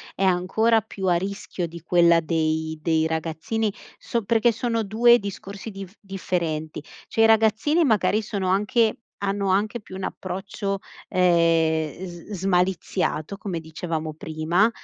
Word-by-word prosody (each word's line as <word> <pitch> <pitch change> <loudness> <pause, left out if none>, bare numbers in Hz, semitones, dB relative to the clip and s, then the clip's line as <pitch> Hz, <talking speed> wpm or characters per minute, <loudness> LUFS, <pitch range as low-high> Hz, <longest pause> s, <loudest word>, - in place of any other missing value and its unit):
è 195 - -2
ancora 190 +5 +3
più 195 -2 -7
a 180 - +4
rischio 190 0 -3
di 170 +1 -10
quella 170 0 +4
dei 160 -1 -1
dei 160 0 +2
ragazzini, 165 +7 -1 0.3
so 235 -2 -2
perché 230 +2 +3
sono 230 0 -1
2 235 +4 +5
discorsi 200 +1 -7
diff 195 -2 -9
differenti 170 -6 -3 0.2
cioè 225 - 0
i - - +7
ragazzini 225 +9 +3
magari 215 -4 +2
sono 200 -3 -2
anche 215 +4 +2 0.2
hanno 200 0 -1
anche 210 +5 +1
più 195 -3 -11
un 190 - -6
approccio, 195 +1 -4 0.3
ehm, 165 -2 +2
s 175 +3 -11
smaliziato 180 -2 0
come 185 -5 -4
dicevamo 160 -1 -4
prima, 160 +7 +1
190 Hz, 135 wpm, -24 LUFS, 165-210 Hz, 0.3 s, i